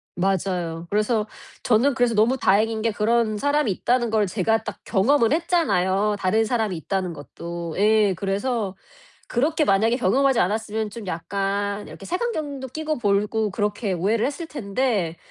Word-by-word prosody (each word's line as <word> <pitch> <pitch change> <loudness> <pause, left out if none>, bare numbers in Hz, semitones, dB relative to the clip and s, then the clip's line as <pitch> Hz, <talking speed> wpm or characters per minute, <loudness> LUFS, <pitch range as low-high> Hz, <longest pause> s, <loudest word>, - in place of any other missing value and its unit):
맞아요. 180 -3 -1
그래서 215 +1 +1 0.4
저는 250 +5 +3
그래서 245 -2 +1
너무 225 +5 +3
다행인 220 0 +2
게 230 - +1
그런 215 +1 +1
사람이 285 +1 +1
있다는 240 +5 0
걸 215 -1 +2
제가 220 +3 0
딱 - - -7
경험을 235 +4 +2
했잖아요. 210 - +1
다른 215 +4 +2
사람이 220 -4 -1
있다는 185 +2 -2
것도. 170 +3 -7
예 210 0 +4
그래서 200 +2 -2 0.5
그렇게 300 +5 +1
만약에 220 +5 +3
경험하지 260 +4 +2
않았으면 215 +2 -1
좀 220 0 -8
약간 200 +3 -2
이렇게 - - -11
색안경도 310 - -3
끼고 310 +3 -3
보고 210 0 +1
그렇게 205 +1 -1
오해를 205 +6 +1
했을 310 +4 -4
텐데 200 - -1
215 Hz, 345 characters per minute, -23 LUFS, 195-245 Hz, 0.5 s, 예